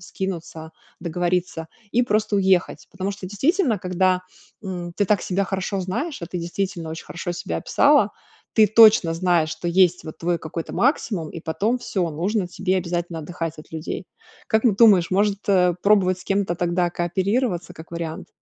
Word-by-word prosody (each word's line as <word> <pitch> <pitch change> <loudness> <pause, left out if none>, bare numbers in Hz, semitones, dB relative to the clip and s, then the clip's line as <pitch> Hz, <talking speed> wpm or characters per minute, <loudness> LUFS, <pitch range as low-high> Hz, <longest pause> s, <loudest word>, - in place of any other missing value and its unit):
скинуться, 170 -4 -6 0.3
договориться 175 0 -2 0.3
и 245 +2 +3
просто 215 -2 +1
уехать. 190 -2 +1
Потому 190 +1 -3
что 195 -1 -8
действительно, 255 - +1
когда, 185 0 +1 0.4
м, 175 -3 -5
ты 205 - +2
так 200 -1 +1
себя 195 +1 0
хорошо 195 +1 -2
знаешь, 235 - -3
а - - -3
ты 180 - -5
действительно 175 -1 -3
очень 160 - -7
хорошо 170 +3 -5
себя 170 - -4
описала, 280 - +3 0.4
ты 215 -2 +6
точно 215 -5 +6
знаешь, 170 -2 +1
что 175 +2 -4
есть, 180 0 +3
вот, 155 - -9
твой 170 0 0
какой-то 160 +1 -6
максимум 215 - 0
и 165 - -7
потом 205 +10 -1
всё, 180 -8 -2
нужно 185 +6 -1
тебе 190 +1 -1
обязательно 175 -2 -3
отдыхать 165 0 -5
от 155 - -13
людей. 160 0 -5 0.4
Как 220 +1 +1
н 240 - +6
ты - - -6
думаешь, 200 -7 +6
может, 200 +1 +2
э, 180 -3 +4
пробовать 195 -3 +3
с - - -13
кем-то 195 -3 0
тогда 175 0 0
кооперироваться, 180 +3 -1
как 160 +1 -12
вариант? 165 -1 -5
180 Hz, 175 wpm, -22 LUFS, 170-200 Hz, 0.4 s, ты